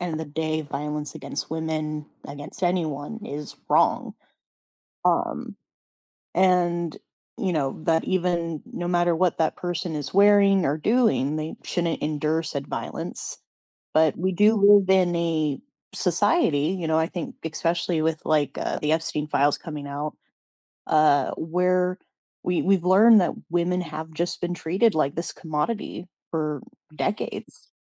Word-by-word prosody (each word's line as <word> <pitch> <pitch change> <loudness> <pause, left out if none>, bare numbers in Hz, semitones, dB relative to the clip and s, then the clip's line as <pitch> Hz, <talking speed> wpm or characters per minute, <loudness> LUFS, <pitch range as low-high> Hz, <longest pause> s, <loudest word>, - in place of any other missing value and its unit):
end 175 -2 -3
of 155 - -3
the 160 - -3
day 155 +1 -2
violence 150 0 -4
against 135 - -5
women, 155 -1 -3 0.2
against 145 +5 -9
anyone 175 +3 -1
is 145 +1 -6
wrong. - - +2 0.9
Um - - 0 0.8
and, 175 -2 +2 0.4
you 190 -3 -1
know, 140 -4 -1
that 165 -1 +2
even 170 -4 -1
no 175 - -5
matter 175 -1 +2
what 180 0 +1
that 160 -1 +1
person 175 -2 -3
is 145 -2 -5
wearing 200 -2 +5
or 145 +3 +1
doing, 210 - +2
they 155 +1 -4
shouldn't 170 -2 -1
endure 155 +2 0
said 140 -3 -4
violence. - - -5 0.6
But 155 -1 +3
we 185 +3 0
do 210 +4 +4
live 200 -2 +6
in 185 -2 +4
a 160 -4 0 0.3
society, 165 - +2
you 165 - -3
know, 160 0 +2
I 160 - +3
think 175 -1 -6
especially 165 +1 0
with 160 0 0
like, 145 -3 +1
uh, - - -2
the 150 - 0
Epstein 155 -2 0
files 145 -1 +2
coming 150 -4 -7
out, 145 +2 -4 0.7
uh, 150 -3 +4
where 180 +2 0 0.5
we 180 -1 +1
we've 190 -2 +2
learned 210 +4 +7
that 180 - 0 0.2
women 175 +1 +1
have 160 -1 -7
just 170 +3 -2
been 175 0 -2
treated 190 +7 +1
like 145 -3 +1
this 170 - -3
commodity 170 +4 -3 0.2
for 155 -4 -2 0.3
decades. 155 +10 -4
165 Hz, 145 wpm, -25 LUFS, 155-180 Hz, 0.9 s, learned